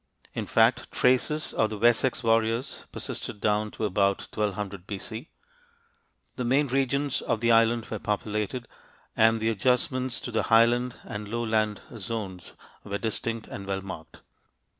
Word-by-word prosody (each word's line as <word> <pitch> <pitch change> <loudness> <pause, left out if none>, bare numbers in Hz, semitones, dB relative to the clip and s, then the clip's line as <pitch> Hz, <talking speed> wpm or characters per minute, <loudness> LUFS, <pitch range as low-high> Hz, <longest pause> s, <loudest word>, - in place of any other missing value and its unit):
In - - -3
fact, - - +3
traces 130 +5 +2
of 110 - +2
the 110 - -5
Wessex 120 +3 +3
warriors 115 +2 +1
persisted 105 - -5
down 105 +1 +1
to 110 - -3
about 100 0 +2
1200 100 -3 -2
B.C. 110 +6 -6 1.1
The 125 - -1
main 135 +5 +3
regions 135 +1 +1
of 115 - -1
the 115 +1 +3
island 115 0 +4
were 110 - -2
populated, 105 +4 -2 0.5
and 115 0 +4
the 110 +1 +1
adjustments 125 +3 +1
to 125 - -5
the 110 - +1
highland 120 +2 +4
and 105 -2 -6
lowland 110 -2 0 0.2
zones 95 -3 -5 0.3
were 100 -1 -3
distinct 115 +1 -2
and 100 -1 -7
well 95 -1 -2
marked. 95 - -9
115 Hz, 140 wpm, -27 LUFS, 105-120 Hz, 1.1 s, island